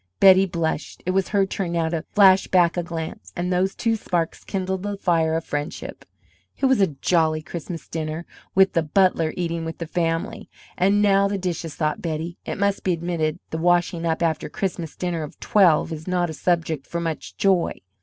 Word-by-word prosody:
Betty 190 0 +7
blushed. 160 -4 -3
It 185 - +1
was 190 0 +1
her 200 -2 +2
turn 190 -2 -3
now 165 -1 +1
to 165 -1 -2
flash 195 -2 +6
back 175 -2 +3
a 175 - 0
glance; 165 -2 -6
and 180 +1 -1
those 185 +2 +1
two 230 -1 +1
sparks 175 -6 -2
kindled 190 -1 -3
the 205 0 -3
fire 165 -4 +1
of 165 - -2
friendship. 145 +2 -5 0.5
It - - 0
was 265 -5 +4
a 195 - +5 0.2
jolly 160 -3 +2
Christmas 170 0 -7
dinner, 160 +1 -4 0.3
with 190 0 +5
the 165 - +3
"butler" 165 0 +2
eating 170 -2 -2
with 165 0 -5
the 165 - -4
family. 165 0 -2 0.3
"And 200 +3 +3
now 200 -1 +4
the 200 0 -2
dishes!" 175 -4 -4
thought 155 -1 -1
Betty. 165 +1 -4
It - - -3
must 200 0 0
be 185 - +2
admitted 165 -2 -1
the 160 - -3
"washing 175 0 +2
up" 165 0 0
after 160 -2 0
a - - -12
Christmas 175 -5 -4
dinner 175 -2 -2
of 150 - -8
twelve 175 -6 +3
is 160 +1 -7
not 175 -2 0
a - - -6
subject 165 -3 -1
for 170 - -3
much 165 -2 -4
joy. 195 -4 +2
170 Hz, 200 wpm, -23 LUFS, 160-190 Hz, 0.5 s, Betty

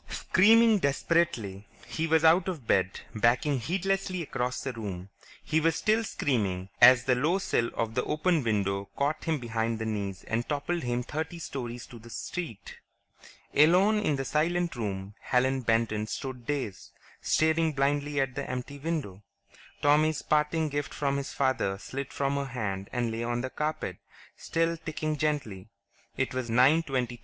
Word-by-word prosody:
Screaming 220 +2 +5
desperately, 135 - 0 0.2
he 160 +1 -2
was 160 0 +3
out 170 +3 +5
of 165 -10 -4
bed, 95 -3 +1
backing 120 +5 +2
heedlessly 185 +5 -1
across 125 -3 -2
the 135 - -4
room. 100 -5 -6 0.3
He 160 - +1
was 165 +1 +2
still 220 +2 +2
screaming 100 - -1
as 125 0 +8
the 130 - +3
low 150 +9 +2
sill 120 -11 0
of 115 -1 -1
the 125 - 0
open 160 0 +1
window 100 -3 -1
caught 145 +3 -1
him 160 -2 +1
behind 115 -2 -2
the 110 - -4
knees 100 -3 -3
and 115 +1 -2
toppled 155 +4 -1
him 120 0 -1
thirty 160 +6 -4
stories 125 -7 -6
to 120 - -12
the 115 +1 -13
street. 115 - -6 0.7
Alone 185 +8 +5
in 155 -8 +1
the 135 0 -3
silent 170 +3 0
room, 100 -3 -4
Helen 130 +1 +1
Benton 115 -2 +1
stood 125 0 -6
dazed, 135 -10 -3 0.3
staring 160 0 +2
blindly 145 +1 0
at 135 -2 0
the - - -5
empty 130 +3 -5
window. 140 - -3 0.6
Tommy's 150 +1 +3
parting 155 +1 +1
gift 145 0 -3
from 140 -1 0
his 140 -1 -4
father 130 -8 0
slid 135 +6 -6
from 140 0 -1
her 140 - -1
hand 100 -7 -4
and 120 -2 -1
lay 115 +1 -3
on 120 0 -1
the 130 +1 -4
carpet, 155 +1 -3 0.4
still 165 0 -1
ticking 155 -1 -3
gently. 140 -10 -2 0.5
It 130 - -1
was 130 -2 -3
9:23 135 +4 +4
on 125 -1 +1
Mars. 120 - -10
135 Hz, 165 wpm, -28 LUFS, 115-155 Hz, 0.7 s, as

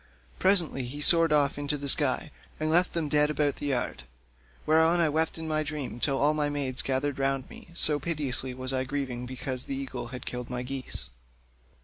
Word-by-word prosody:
Presently 175 -9 +3
he 135 +4 -7
soared 165 +1 +5
off 145 -1 +2
into 145 +1 -2
the 140 0 -6
sky, 145 +1 +2 0.3
and 155 0 0
left 175 +2 +4
them 170 - -1
lying 150 - -4
dead 150 0 +3
about 150 -2 0
the 145 - -4
yard; 125 - -1 0.6
whereon 160 +2 +4
I 165 -2 +3
wept 160 +2 0
in 160 0 -5
my 155 0 0
dream 150 -5 -4
till 135 +2 +2
all 145 +3 +3
my 150 -1 0
maids 140 -3 +1
gathered 135 +1 -1
round 135 -1 0
me, - - -11
so 150 -3 +1
piteously 135 -5 -2
was 130 +1 -3
I 130 0 0
grieving 130 -2 -4
because 130 0 -2
the 135 - -4
eagle 135 -3 -5
had 125 +1 -8
killed 125 -1 -5
my 125 0 -3
geese. 130 - -5
145 Hz, 205 wpm, -28 LUFS, 130-155 Hz, 0.6 s, soared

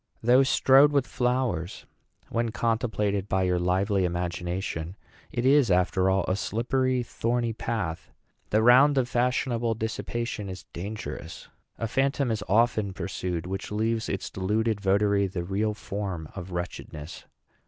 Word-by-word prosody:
Though 125 +3 +6
strewed 135 +1 +5
with 140 -3 +2
flowers, 125 -10 -1 0.4
when 115 0 0
contemplated 110 -4 -1
by 95 0 +1
your 90 -1 +1
lively 95 +3 +1
imagination, 90 0 -3 0.4
it 120 - -2
is, 135 -3 +5
after 90 +1 +2
all, 95 -1 +2
a 90 - +1
slippery, 125 +4 0
thorny 120 0 -1
path. 105 -8 -3 0.4
The 110 +1 +2
round 135 +4 +6
of 130 -2 +2
fashionable 120 -2 0
dissipation 110 -1 -3
is 95 -1 -8
dangerous. 105 +5 -7 0.3
A 115 - -2
phantom 135 +1 +1
is 105 -2 -2
often 110 -2 +2
pursued, 90 -3 -4
which 95 +2 -5
leaves 110 +1 -1
its 95 - -3
deluded 105 +3 0
votary 100 0 +2
the 90 -2 -4
real 105 +4 -1
form 95 -6 -5
of 95 -2 -7
wretchedness." 85 -3 -6
105 Hz, 135 wpm, -27 LUFS, 95-120 Hz, 0.4 s, Though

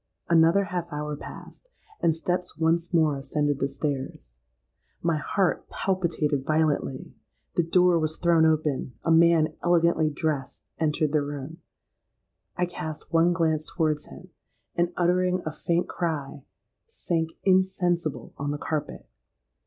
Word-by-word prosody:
Another 170 +4 +5
half 180 -3 -4
hour 150 0 -3
passed; - - -11 0.3
and 165 -2 +3
steps 180 0 -2
once 165 +2 +1
more 160 -4 +3
ascended 145 +1 -1
the 135 - +1
stairs. 135 - -5 0.6
My 165 -2 +2
heart 185 +3 0
palpitated 165 -7 -1
violently! 155 -3 0 0.4
The - - +2
door 175 +1 +3
was 155 0 -1
thrown 170 -2 +3
open;—a 155 -4 0
man 165 -1 +5
elegantly 170 -2 +3
dressed 145 -2 -3
entered 155 -1 +1
the 150 -1 +2
room;—I 145 +4 -8
cast 160 -2 -7
one 165 +1 +4
glance 160 -3 0
towards 155 -3 0
him, 185 - -13 0.5
and, 175 0 +1
uttering 180 +1 +2
a 155 - -2
faint 170 +3 -1
cry, 145 -5 -4 0.4
sank 165 - -2
insensible 175 - +1
on 145 0 -2
the 145 - -2
carpet. 150 0 -4
160 Hz, 125 wpm, -26 LUFS, 150-175 Hz, 0.6 s, Another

